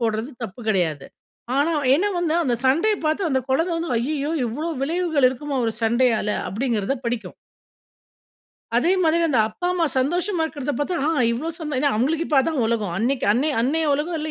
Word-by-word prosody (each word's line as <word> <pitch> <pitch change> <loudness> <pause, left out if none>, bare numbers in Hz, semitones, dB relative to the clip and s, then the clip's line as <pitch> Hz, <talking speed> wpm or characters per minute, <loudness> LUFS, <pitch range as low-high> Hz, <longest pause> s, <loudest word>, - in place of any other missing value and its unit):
போடுறது 225 +3 -1
தப்பு 220 +2 -7
கிடையாது. 165 -8 0 0.5
ஆனா 290 +4 +2
அவ 290 - -1
ஏன்னா 375 +8 +2
வந்து 330 -2 0
அந்த 250 -5 +1
சண்டையை 350 +11 +3
பார்த்து 315 +4 +1
அந்த 265 -3 +1
குழந்தை 325 +7 +1
வந்து 330 -4 -3
"ஐய்யய்யோ! 285 +5 -1 0.2
இவ்வளோ 295 +9 -3
விளைவுகள் 320 -2 +2
இருக்குமா 275 +2 -4
ஒரு 225 - 0
சண்டையால?" 230 -1 +2 0.2
அப்படிங்கிறத 225 +1 -1
படிக்கும். 235 -1 -3 1.4
அதே 270 +9 +3
மாதிரி 330 +1 +3
அந்த 265 -6 +2
அப்பா 355 +11 -5
அம்மா 345 -3 +1
சந்தோஷமா 345 +6 0
இருக்கிறத 290 -3 -3
பார்த்தா 350 +5 -1
"ஆ! - - +3 0.2
இவ்வளவு 315 +8 -3
சந்" 300 -4 -4
ஏன்னா 285 +1 +2
அவங்களுக்கு 310 +8 0
இப்போ 290 - +3
அதான் 285 -3 0
உலகம். 215 -6 -1
அன்னைக்கு 250 +4 0
அன்னைய 285 +6 +1
அன்னைய 310 +5 +1
உலகம் 315 +3 -2
இல்லை, 310 0 -3
285 Hz, 175 wpm, -22 LUFS, 240-325 Hz, 1.4 s, சண்டையை